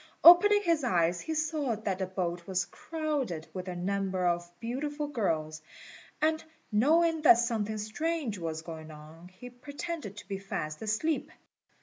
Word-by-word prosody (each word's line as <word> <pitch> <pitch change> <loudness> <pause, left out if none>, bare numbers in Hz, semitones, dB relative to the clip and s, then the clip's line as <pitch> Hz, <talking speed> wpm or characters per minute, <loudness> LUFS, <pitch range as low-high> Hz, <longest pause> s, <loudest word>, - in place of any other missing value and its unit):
Opening 410 +5 +9
his 335 -5 +2
eyes, 175 -6 +2
he 320 - -3
saw 305 -5 0
that 200 -3 -3
the 190 - -1
boat 175 -2 -3
was 185 -2 0
crowded 285 - -3
with 185 0 -5
a 180 - -4
number 190 0 -1
of 175 0 0
beautiful 290 +6 -3
girls; 160 - -1 0.6
and 315 +1 +1 0.3
knowing 320 +9 +3
that 290 -6 +8
something 220 -3 -1
strange 235 - -2
was 160 -1 -4
going 160 -1 -8
on, 155 +3 -12
he 185 +7 -12
pretended 285 - -6
to - - -10
be 195 -1 -4
fast 155 -6 -4
asleep. 220 +9 -1
215 Hz, 150 wpm, -30 LUFS, -, 0.6 s, Opening